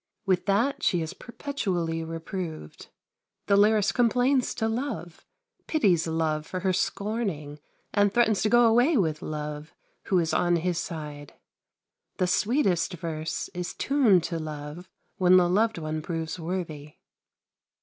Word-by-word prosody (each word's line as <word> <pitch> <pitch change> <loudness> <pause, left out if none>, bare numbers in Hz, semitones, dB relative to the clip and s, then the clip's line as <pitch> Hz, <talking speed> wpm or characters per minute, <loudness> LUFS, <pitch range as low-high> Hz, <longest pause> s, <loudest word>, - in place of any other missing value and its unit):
With 185 0 +1
that 230 +8 +1
she 175 -2 +1
is 160 - -6
perpetually 180 - -3
reproved. 165 - -6 0.6
The 200 - +3
lyrist 210 0 +4
complains 250 +2 +2
to 220 - 0
Love, 220 - -4 0.4
pities 185 - +2
Love 160 -1 -1
for 185 - -4
her 190 0 +1
scorning, 190 -8 -2 0.3
and 205 -1 +3
threatens 220 -2 +2
to 215 - +2
go 240 +1 +6
away 245 +7 +4
with 160 -6 0
Love, 150 0 -6 0.3
who 190 - +2
is 165 -2 +1
on 175 0 +2
his 170 0 0
side. 150 -4 -7 0.8
The 185 - +2
sweetest 195 - +1
verse 160 -2 -4
is 175 0 -5
tuned 240 - +3
to 165 -1 -3
love 155 +3 -7 0.3
when 185 -1 +6
the 180 -1 +4
loved 215 +4 +2
one 155 -1 -3
proves 165 +1 -4
worthy. 160 -4 -5
180 Hz, 140 wpm, -27 LUFS, 160-215 Hz, 0.8 s, go